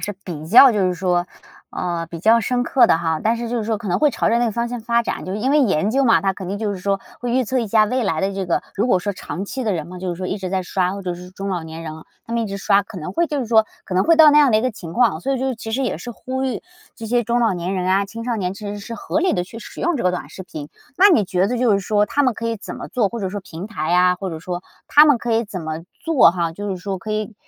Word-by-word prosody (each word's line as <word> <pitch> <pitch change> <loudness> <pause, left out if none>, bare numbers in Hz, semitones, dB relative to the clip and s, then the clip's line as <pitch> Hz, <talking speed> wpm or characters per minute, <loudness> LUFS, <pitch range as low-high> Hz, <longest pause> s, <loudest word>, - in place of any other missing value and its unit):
是 205 - -3
比 155 -4 -6
较 245 +8 +8
就 210 - 0
是 180 - 0
说， 180 0 0 0.4
呃， 170 -2 -3
比 170 0 -8
较 225 +6 +4
深 245 +3 0
刻 255 +1 +4
的 - - +4
哈。 160 -1 -1
但 225 +2 +2
是 235 0 -4
就 240 - -2
是 220 - -2
说 220 0 0
可 205 0 -7
能 180 - +1
会 300 -1 +4
朝 - - 0
着 235 - +3
那 240 - +2
个 225 - -1
方 235 +2 -1
向 245 -1 -5
发 235 +1 +1
展， - - -4
就 185 - -4
因 225 +6 -1
为 295 +1 +4
研 200 - +2
究 270 +3 +2
嘛， 230 - +5
它 195 -1 +1
肯 190 -1 -8
定 200 - -3
就 210 -1 -2
是 195 - -6
说 195 +1 -1 0.2
会 245 -1 -3
预 255 +1 +2
测 260 +4 -1
一 235 - -1
下 215 +1 +4
未 250 +4 -1
来 165 -7 0
的 195 +1 0
这 195 -1 -3
个 175 - 0
如 210 +5 0
果 190 -7 +3
说 205 +3 -3
长 185 0 -6
期 260 +6 -5
的 215 - +1
人 160 -4 -3
们 180 0 -9
就 185 - -4
是 175 - -2
说 185 +1 -4
一 195 - -3
直 185 -1 -4
在 190 0 -1
刷， 180 0 -1
或 200 - -6
者 180 -1 -3
是 180 +1 -11
中 195 +1 -6
老 180 -3 -2
年 160 +1 -8
人 155 -1 -6 0.3
他 230 - -8
们 235 0 0
一 - - -2
直 200 -1 -5
刷， 200 0 +3
可 200 -1 -10
能 155 - -6
会 340 +1 +1
就 295 -2 -2
是 250 - -3
说 220 -1 +4 0.2
可 185 - -6
能 185 - +3
会 330 0 +5
到 315 -2 +8
那 295 - +6
样 290 -3 +5
的 215 - +4
一 220 - +1
个 255 - +1
情 170 -7 -9
况 240 -9 +3
哦。 - - -10
所 275 - -1
以 - - -2
就 265 0 -1
其 225 0 -7
实 255 +5 -1
也 240 -11 -2
是 240 - -7
呼 260 +3 -4
吁 260 - -3 0.3
这 225 - -7
些 240 +2 +1
中 235 +2 0
老 225 -3 +3
年 180 +2 -3
人 185 -1 -2
啊、 195 +1 +2
青 230 +3 -8
少 240 -2 -1
年 185 -1 -2
其 210 0 -8
实 205 0 -5
是 230 +3 -7
合 230 - -2
理 370 - +2
地 180 -2 -1
去 225 +5 -10
使 225 - -10
用 345 -1 +1
这 240 - -3
个 180 - +3
短 180 - -5
视 190 - -8
频。 150 -5 -8 0.3
那 390 +3 +7
你 220 - +4
觉 180 +1 +1
得 245 +3 -2
就 240 -3 +3
是 200 - +2
说 210 +1 +1
他 290 - +1
们 255 -3 +3
可 230 +1 -5
以 225 - -2
怎 205 - -8
么 - - -7
做， 225 -5 +1
或 235 - -5
者 190 - -2
说 205 +2 -5
平 175 0 -8
台 180 -9 -3
呀， 180 +1 +4
或 190 -1 -5
者 160 - -6
说 175 +1 -5 0.3
他 300 +1 +8
们 290 -5 +4
可 235 0 -2
以 230 +1 +1
怎 200 -4 -6
么 160 0 -5 0.2
做 325 - +5
哈， 170 -2 -2
就 205 +4 -5
是 190 - -2
说 190 +1 -4
可 215 +2 -5
以 215 +1 -3
205 Hz, 360 characters per minute, -20 LUFS, 180-235 Hz, 0.4 s, 较